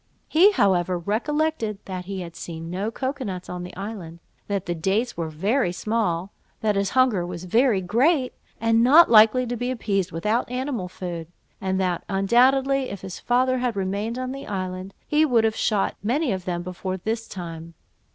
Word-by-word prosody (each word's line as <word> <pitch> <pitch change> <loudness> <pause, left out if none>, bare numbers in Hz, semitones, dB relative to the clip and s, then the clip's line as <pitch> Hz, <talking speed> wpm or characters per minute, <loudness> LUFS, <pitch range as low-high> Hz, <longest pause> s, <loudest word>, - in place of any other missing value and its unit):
He, 365 +6 +6
however, 185 - +2
recollected 230 - -1
that 185 -2 -5
he 195 0 -5
had 170 -1 -8
seen 165 0 -7
no 195 +4 -2
cocoa 265 +4 -3
nuts 185 -5 -5
on 180 0 -5
the 180 +1 -8
island, 195 -4 -7 0.3
that 200 -3 -2
the 175 - -1
dates 195 +9 0
were 165 -2 -3
very 195 - 0
small, 195 -2 -1 0.3
that 210 -2 +1
his 200 0 +1
hunger 250 -8 +4
was 175 0 -6
very 225 +2 +3
great, 255 - +2 0.3
and 225 0 +3
not 300 +6 +7
likely 225 +3 +6
to 245 0 -3
be 245 +2 -2
appeased 200 -7 -1
without 210 +10 -1
animal 250 -6 -3
food, 175 -3 -6 0.3
and 190 0 -1
that 180 -2 0
undoubtedly 260 +7 +3
if 200 - -7
his 190 -1 -7
father 255 +1 +2
had 245 -3 -1
remained 200 +4 -2
on 255 0 -3
the 275 +1 -7
island, 185 -1 -4
he 300 +1 +3
would 245 -7 +3
have 220 0 +1
shot 205 -2 +1
many 255 +6 0
of 185 -2 -3
them 175 -1 -2
before 185 +1 -4
this 225 +4 -3
time. 165 -3 -8
205 Hz, 180 wpm, -24 LUFS, 180-250 Hz, 0.3 s, not